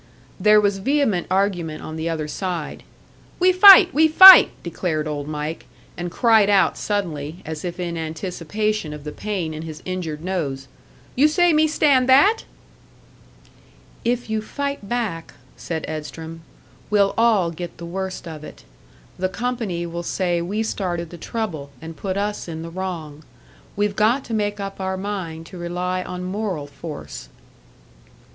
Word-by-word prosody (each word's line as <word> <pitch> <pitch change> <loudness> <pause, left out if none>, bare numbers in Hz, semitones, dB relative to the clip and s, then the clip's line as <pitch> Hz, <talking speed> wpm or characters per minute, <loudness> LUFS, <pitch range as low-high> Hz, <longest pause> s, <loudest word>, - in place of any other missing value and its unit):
There 210 +2 +6
was 205 -1 +1
vehement 245 -5 0
argument 180 -5 -1
on 155 - -7
the 160 +1 -3
other 155 -2 -3
side. 175 -1 -4 0.6
"We 365 +1 +4
fight! 375 0 +9
We 315 +2 +5
fight!" 375 +4 +10
declared 165 -3 -3
Old 145 -1 -4
Mike, 150 +1 -5 0.3
and 175 0 -4
cried 220 +1 +3
out 200 -2 +3
suddenly, 170 -6 -4
as 155 -1 -6
if 175 0 -5
in 170 -1 -3
anticipation 170 +3 -3
of 150 -1 -9
the 150 - -6
pain 185 -4 -4
in 155 - -6
his 160 -1 -9
injured 165 -4 -4
nose. 145 -8 -3 0.5
"You 285 +4 +5
say 350 +2 +3
me 310 +1 +4
stand 280 -4 +2
that?" 395 +13 +5 1.6
"If 240 +1 -1
you 220 0 -2
fight 280 -2 -5
back," 220 -9 -3 0.2
said 160 -2 -5
Edstrom, 160 +1 -7 0.5
"we'll 200 -1 +3
all 220 -7 +3
get 175 +1 -8
the 170 - -8
worst 190 +1 -5
of 155 -2 -8
it. - - -12 0.6
The 185 0 0
company 225 -6 -3
will 170 0 -5
say 175 -1 -1
we 205 +6 -2
started 175 -6 -3
the 175 - -9
trouble, 170 -12 -4
and 165 +2 -9
put 190 +2 -4
us 205 -1 -3
in 160 -1 -6
the 165 - -8
wrong. 165 -5 -6 0.5
We've 205 0 0
got 230 +6 +2
to 230 - -6
make 205 -1 -1
up 195 -1 -6
our 190 0 -2
mind 185 -5 -5
to 180 +2 -11
rely 180 +1 -3
on 180 0 -6
moral 185 -5 -3
force." 150 +2 -9
185 Hz, 155 wpm, -21 LUFS, 165-215 Hz, 1.6 s, fight